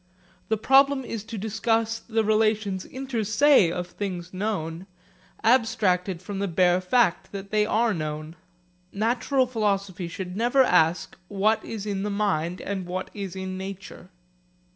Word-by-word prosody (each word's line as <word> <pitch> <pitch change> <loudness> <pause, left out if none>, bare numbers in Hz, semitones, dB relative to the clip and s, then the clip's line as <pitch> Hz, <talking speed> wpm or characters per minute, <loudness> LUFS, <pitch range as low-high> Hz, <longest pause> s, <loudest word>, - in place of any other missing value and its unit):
That 220 -1 -1
problem 275 0 +4
is 225 -3 -5
to 225 0 -7
discuss 225 +2 0
the 225 -1 -1
relations 215 -3 +1
inter 260 -3 -4
se 215 - +4
of 180 +1 -3
things 180 -2 -6
known, 185 -3 -3 0.6
abstracted 195 -7 +2
from 195 +1 -5
the 200 - -1
bare 180 0 +3
fact 190 -2 +1
that 195 0 -7
they 210 -1 +2
are 225 0 +2
known. 155 -1 -5 0.6
Natural 245 +5 +1
philosophy 200 -6 -1
should 180 +1 -6
never 245 +5 +3
ask, 170 -6 +2
what 210 +3 +1
is 215 -3 -6
in 200 -2 -2
the 210 - -2
mind 185 -4 -1
and 190 -3 -4
what 185 +1 -4
is 195 -3 -6
in 190 0 -5
nature. 190 -1 -8
200 Hz, 145 wpm, -25 LUFS, 185-225 Hz, 0.6 s, problem